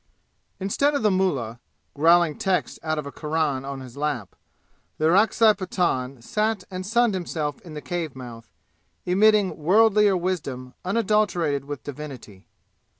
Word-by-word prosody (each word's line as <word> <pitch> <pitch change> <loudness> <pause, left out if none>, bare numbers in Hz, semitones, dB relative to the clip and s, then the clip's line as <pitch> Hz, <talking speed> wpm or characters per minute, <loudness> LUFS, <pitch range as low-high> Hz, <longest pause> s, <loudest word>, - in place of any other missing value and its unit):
Instead 280 +10 +1
of 280 - -1
the 210 - +4
mullah, 135 -12 0 0.3
growling 165 +1 +4
texts 190 -2 -1
out 155 -1 -2
of 150 - -3
a 140 - -6
Quran 150 -4 -1
on 135 -1 -6
his 125 -1 -11
lap, 140 -9 -3 0.6
the 155 - 0
Orakzai 215 +5 +5
Pathan 140 - -2
sat 215 - -1
and 185 0 -4
sunned 235 0 +3
himself 160 -5 -3
in 165 -4 -11
the 150 - -6
cave 170 -6 -4
mouth, 120 -3 -10 0.6
emitting 205 +1 +3
worldlier 205 +4 +4
wisdom 140 -9 -4
unadulterated 190 - +1
with 145 -5 -7
divinity. 130 -9 -9
165 Hz, 140 wpm, -24 LUFS, 140-195 Hz, 0.6 s, Orakzai